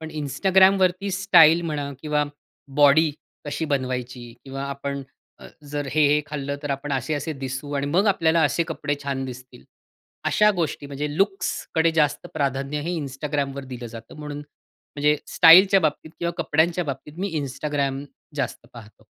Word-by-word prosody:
पण 160 0 -7
Instagramवरती 190 +4 +3
स्टाईल 170 -4 +6
म्हणा 145 -3 -3
किंवा 150 -1 +1 0.5
बॉडी 150 +2 +5 0.3
कशी 145 +2 -3
बनवायची? 125 -4 -3
किंवा 135 0 -6
आपण 140 0 -4 0.7
जर 145 -1 -3
हे, 150 0 +3
हे 150 +1 +3
खाल्लं 140 -1 -4
तर 145 - -4
आपण 140 +1 -3
असे-असे 145 +4 -2
दिसू 135 +1 -6
आणि 140 0 -1
मग 185 +8 +2
आपल्याला 165 -4 +3
असे 170 +3 +1
कपडे 145 -2 -2
छान 135 -1 -3
दिसतील. 125 - -10 0.6
अशा 210 0 +4
गोष्टी 150 -4 -2
म्हणजे 145 +1 -4
लुक्सकडे 195 -4 0
जास्त 150 -2 +1
प्राधान्य 140 0 -1
हे 170 +3 -3
Instagramवर 140 0 -3
दिलं 120 -2 -7
जातं, 115 0 -11
म्हणून 150 -1 -6
म्हणजे 150 0 -3 0.2
स्टाईलच्या 190 +4 +8
बाबतीत 155 0 -1
किंवा 170 0 -2
कपड्यांच्या 165 +3 +1
बाबतीत 145 +3 -7
मी 195 0 -2
Instagram 140 0 -2 0.3
जास्त 125 -3 -3
पाहतो. 110 -3 -14
145 Hz, 145 wpm, -23 LUFS, 140-160 Hz, 0.7 s, स्टाईलच्या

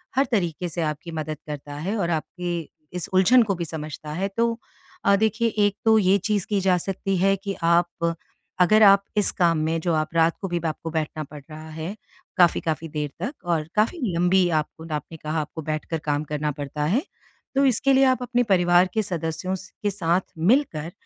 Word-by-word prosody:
हर 270 +2 +4
तरीके 175 -5 -1
से 170 +1 -4
आपकी 155 +2 -3
मदद 155 -1 -4
करता 145 -1 -6
है 180 +9 -3
और 175 -4 0
आपके 175 +2 -3 0.5
इस 175 - -4
उलझन 230 +7 +6
को 200 -3 -1
भी 170 -1 -3
समझता 155 -1 -7
है। 190 +5 -1
तो 230 0 +1 0.5
अ, 200 - +6
देखिए 220 +3 +1 0.2
एक 205 -1 +1
तो 220 0 +6
ये 195 0 +4
चीज़ 210 -4 +1
की 205 -2 +1
जा 185 -1 +3
सकती 195 +1 -2
है 195 +2 +3
कि 195 0 -5
आप 170 0 +2 0.5
अगर 215 +4 +6
आप 200 -1 +7
इस 205 - +3
काम 170 -3 +2
में 165 +1 0
जो 170 0 0
आप 155 -1 0
रात 165 0 +4
को 195 - -2
भी 175 -1 -1
आपको 160 +1 -4
बैठना 155 -1 -2
पड़ 150 +1 -11
रहा 155 +1 -9
है 160 +5 -5 0.4
काफ़ी-काफ़ी 165 -2 +2
देर 150 -1 -3
तक 275 +5 -3
और 165 -3 0
काफ़ी 220 +11 +2 0.2
लंबी 180 +1 +3
आपको 160 0 -2
आपने 150 +2 -6
कहा 155 +1 -2
आपको 155 +2 -7
बैठकर 155 +1 -3
काम 145 0 0
करना 150 0 -2
पड़ता 145 0 -4
है। 210 - +2 0.5
तो 275 +1 +4
इसके 270 +2 +3
लिए 270 +1 +5
आप 255 -1 +2
अपने 245 0 +1
परिवार 180 -3 +4
के 220 - +2
सदस्यों 175 0 -3
स 185 0 -8 0.2
के 205 - +2
साथ 180 -2 +1 0.2
मिलकर 175 - +1
175 Hz, 200 wpm, -24 LUFS, 155-200 Hz, 0.5 s, आप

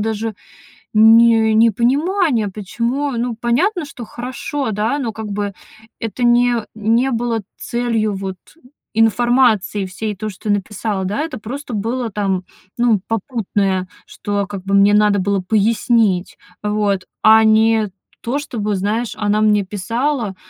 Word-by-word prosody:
даже 220 0 -2 0.6
не 225 0 +6
непонимание, 240 - +2
почему. 235 +8 -2
Ну, 240 -1 -2
понятно, 320 - +1
что 280 -4 -9
хорошо, 255 +2 -4
да, 215 +6 0
но 240 -5 -2
как 220 0 -6
бы 200 0 -3 0.5
это 225 +2 -4
не 240 -1 +3
не 230 +5 +1
было 230 -1 -1 0.2
целью 230 -3 -1
вот 190 -1 -5 0.6
информации 225 -2 +2
всей, 210 +3 -4
то, 215 +3 -5
что 205 +2 -7
я 205 - +4
написала, 205 0 -3
да, 205 +9 -2
это 315 -5 -4
просто 250 +4 -7
было, 230 +3 -2
там, 195 -2 -1 0.3
ну, 235 -3 +3
попутное, 200 -4 -1 0.2
что 205 -1 -3
как 200 -2 -7
бы 195 0 +1
мне 200 +1 +5
надо 210 -1 +4
было 195 +1 0
пояснить, 215 -1 +1 0.3
вот, 210 -2 0 0.2
а 220 0 +7
не 220 0 +3 0.3
то 245 +4 -2
чтобы, 215 -8 -3
знаешь, 210 +5 -1
она 210 0 +1
мне 210 -2 +3
писала, 230 +3 -2
220 Hz, 140 wpm, -18 LUFS, 205-240 Hz, 0.6 s, а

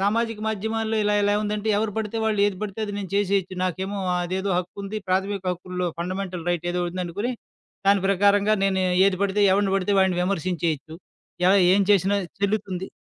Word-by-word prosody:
సామాజిక 225 +2 0
మాధ్యమాల్లో 220 +1 -2
ఇలా 210 0 +2
ఎలా 205 0 +2
ఉందంటే 210 +1 -2
ఎవరు 220 -1 -1
పడితే 220 0 -3
వాళ్ళు, 220 -1 0
ఏది 200 -2 -2
పడితే 210 0 -5
అది, 205 - -5
నేను 195 -3 -6
చేసేయొచ్చు. 195 -2 0
నాకేమో 190 +3 -3 0.2
అదేదో 190 +2 -2
హక్కుంది. 200 +3 -5
ప్రాథమిక 195 +1 0
హక్కుల్లో 180 0 -4
ఫండమెంటల్ 180 0 -4
రైట్ 175 -1 -2
ఏదో 180 0 -1
ఉందనుకొని, 185 +6 -3 0.6
దాని 200 -1 +4
ప్రకారంగా 200 +2 +3
నేను 190 -1 +1 0.2
ఏది 195 -1 +1
పడితే 200 +1 +1
ఎవడిని 195 0 +2
పడితే 195 +1 0
వాడిని 190 -2 +2
విమర్శించేయొచ్చు. 170 -4 -2 0.5
ఎలా 190 - +6 0.2
ఏం 200 - +4
చేసినా 200 0 +3 0.2
చెల్లుతుంది 200 -2 -1
195 Hz, 160 wpm, -24 LUFS, 185-205 Hz, 0.6 s, ఎలా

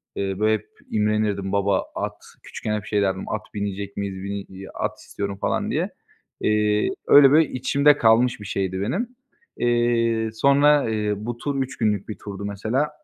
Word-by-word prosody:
Eee, 95 -1 -2
böyle 110 +1 +3
hep 110 -1 -3 0.2
imrenirdim. 105 -2 0
Baba 100 -1 +1
at, - - -3 0.3
küçükken 105 - -4
hep 105 -3 -4
şey 105 +1 0
derdim 95 -1 -1
"At 110 0 -3
binecek 100 -1 -4
miyiz, 100 -2 -4
bini 100 +1 -3
i 95 0 -11
at - - -3
istiyorum." 100 -1 -5
falan - - 0
diye. - - 0 0.5
Eee, 105 0 +2 0.2
öyle 140 -2 +8
böyle 155 0 +5
içimde 140 +3 +3
kalmış 115 +1 +4
bir - - -8
şeydi 95 -1 -2
benim. 190 - -1 0.5
Eee, 120 -2 +1
sonra, 140 +3 +4
eee, 105 -1 0
bu 115 +3 -5
tur 140 +2 -2
3 130 - -9
günlük 105 -3 0
bir 105 - -5
turdu 100 0 -7
mesela. 110 +9 -1
105 Hz, 170 wpm, -23 LUFS, 100-120 Hz, 0.5 s, öyle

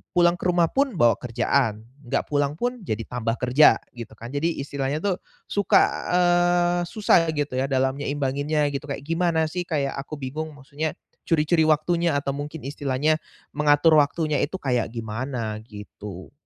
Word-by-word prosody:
pulang 175 0 +4
ke - - -1
rumah 175 -2 +2
pun 275 -4 +1
bawa 120 - +4
kerjaan, 115 -2 0 0.2
nggak - - 0
pulang 145 0 +1
pun 245 +6 -2
jadi 110 +1 -2
tambah 115 -2 -2
kerja, 130 +4 +6 0.2
gitu 115 -2 -9
kan. 115 +3 -9
Jadi, 160 +4 -1
istilahnya 140 +3 -3
tuh, 195 -2 0 0.3
suka, 205 -1 +4 0.3
eee, 175 0 +3
susah, 190 -6 +3
gitu 145 -3 -2
ya, 135 - 0
dalam 135 0 0
nyeimbanginnya, 145 +1 0
gitu, 140 +1 -5
kayak, 140 0 -5
gimana 165 0 +1
sih, 175 0 -3
kayak, 140 -4 -1
aku 150 +2 -6
bingung 145 +3 -5
maksudnya 150 +3 -4 0.3
curi-curi 160 0 +3
waktunya, 165 +1 +2
atau 140 -1 -3
mungkin 145 +2 -6
istilahnya 145 +2 0 0.4
mengatur 150 +2 +4
waktunya 150 0 +2
itu, 165 +6 -2
kayak 125 -5 0
gimana, 115 0 -4
gitu? 105 - -10
145 Hz, 155 wpm, -24 LUFS, 130-165 Hz, 0.4 s, kerja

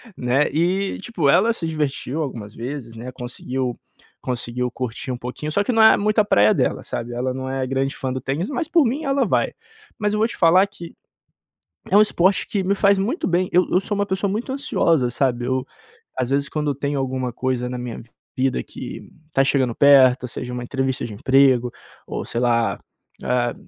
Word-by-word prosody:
né, 130 +3 +1
e 180 +6 0
tipo 195 -10 -1
ela 185 +11 +5
se 170 -7 -4
divertiu 150 -1 -2
algumas 115 -8 -5
vezes, 120 -1 -6
né, 120 +3 -7
conseguiu 125 0 -4 0.4
conseguiu 125 0 -3
curtir 125 0 -5
um 125 - -3
pouquinho, 125 +5 -5
só 200 +6 +2
que 230 - -1
não 225 -2 +3
é 220 - +7
muito 215 +2 +1
a 210 - +4
praia 105 - +4
dela - - 0
sabe. 120 +1 -5
Ela 125 +2 -2
não 130 0 -5
é 135 0 -2
grande 135 +1 -1
fã 130 -1 -3
do 130 - -4
tênis, 140 - -2
mas 315 +2 -2
por 330 -4 +4
mim 280 +7 -1
ela 275 0 +2
vai. - - +1 0.4
Mas 210 -2 0
eu 210 - 0
vou 220 - +3
te 235 - -7
falar 180 +3 +5
que 175 -4 -11 1.0
é 195 - +4
um 210 - +8
esporte 190 -2 +2
que 200 -2 -1
me 195 +2 0
faz 200 0 +4
muito 240 - -1
bem. 180 +1 +1
Eu 180 +1 +4
eu 180 - +4
sou 205 +1 -3
uma 200 0 0
pessoa 195 0 -1
muito 225 +6 -3
ansiosa, 165 - +1
sabe, 125 -2 0
eu 130 0 -1 0.5
às 130 -1 -1
vezes 140 +1 +1
quando 150 -2 -1
tem 140 +2 -3
alguma 130 -2 -2
coisa 125 0 -2
na 125 0 -5
minha 125 -2 -6 0.4
vida 130 0 0
que - - -9 0.2
tá 135 - +3
chegando 130 -4 +1
perto, 135 -3 +6
ou - - -3
seja, 125 +1 -6
uma 125 0 -4
entrevista 135 0 -2
de 110 - -6
emprego, 130 +1 +3 0.3
ou - - -4
sei 115 - -3
lá, 115 -2 +1 0.5
ah 120 -1 0
135 Hz, 205 wpm, -22 LUFS, 125-190 Hz, 1.0 s, um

